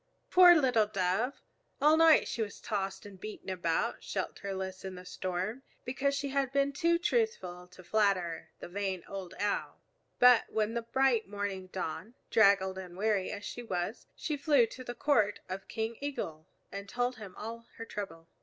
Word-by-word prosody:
Poor 360 -1 +9
little 250 -8 +3
Dove! 200 +5 -1 0.4
All 300 +2 +6
night 325 -1 +6
she 230 - -3
was 210 -2 -4
tossed 195 -2 -3
and 200 -2 -11
beaten 215 -2 -6
about 180 +5 -1
shelterless 190 -1 -4
in 190 -1 -6
the 180 0 -10
storm, 185 +6 -3 0.2
because 275 +2 0
she 280 0 -2
had 270 -1 0
been 280 0 +2
too 340 +2 +3
truthful 335 - -1
to 180 +1 -15
flatter 185 -5 +1
the - - -7
vain 190 -1 -3
old 195 -3 -7
Owl. 205 0 -1 0.4
But 250 -2 +7
when 220 0 0
the 235 - -1
bright 235 -1 +2
morning 200 -2 -4
dawned, 190 +5 -5 0.2
draggled 195 -3 +4
and 180 -1 -9
weary 205 -2 +1
as 205 0 -6
she 245 - -5
was, 190 -1 -3
she 300 -2 -3
flew 285 -4 +4
to 255 +3 -9
the 240 -1 -6
court 215 -9 +2
of 190 +1 -6
King 225 +1 -3
Eagle 165 - -4 0.2
and 200 0 -7
told 245 +3 -1
him 200 -4 -10
all 230 +2 -7
her 230 - -6
trouble. 195 -7 -7
210 Hz, 175 wpm, -31 LUFS, 190-250 Hz, 0.4 s, Poor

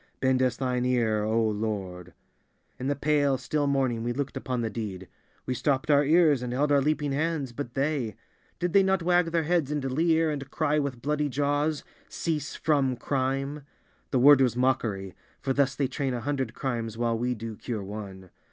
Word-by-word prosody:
Bend 130 -1 +2
us 125 -2 +1
Thine 125 -2 -1
ear, 115 -4 +1
O 110 +2 +1
Lord! 100 -5 -4 0.7
In 130 - -3
the 145 - +1
pale, 145 -1 +2
still 145 +3 -1
morning 130 -4 +1
we 120 +1 -1
looked 140 +1 -3
upon 130 -2 -2
the 115 - -1
deed. 95 -4 -5 0.4
We 130 - -1
stopped 135 +3 0
our 145 0 +5
ears 155 -3 +4
and 125 -1 -3
held 145 +3 +1
our 140 -1 +5
leaping 150 0 0
hands, 150 -2 -1
but 120 0 -6
they—did 145 - -3
they 200 - +7
not 190 -2 +1
wag 175 0 +3
their 165 0 0
heads 165 -3 +1
and 150 -2 -2
leer 160 +2 +2
and 140 -2 -5
cry 150 0 +1
with 135 -4 -3
bloody 150 +1 0
jaws: 145 +3 0 0.3
Cease 155 -3 -3
from 140 -4 +1
Crime! 135 +3 -2 0.5
The 130 - +1
word 135 +2 +7
was 125 -3 +2
mockery, 115 -7 0 0.3
for 135 - -1
thus 140 0 +2
they 140 - 0
train 135 0 -2
a 120 - -4
hundred 135 -3 -2
crimes 115 -4 -3
while 115 -1 +1
we 125 +2 -1
do 110 0 -6
cure 110 -2 -5
one. 95 -2 -8
135 Hz, 190 wpm, -27 LUFS, 120-145 Hz, 0.7 s, they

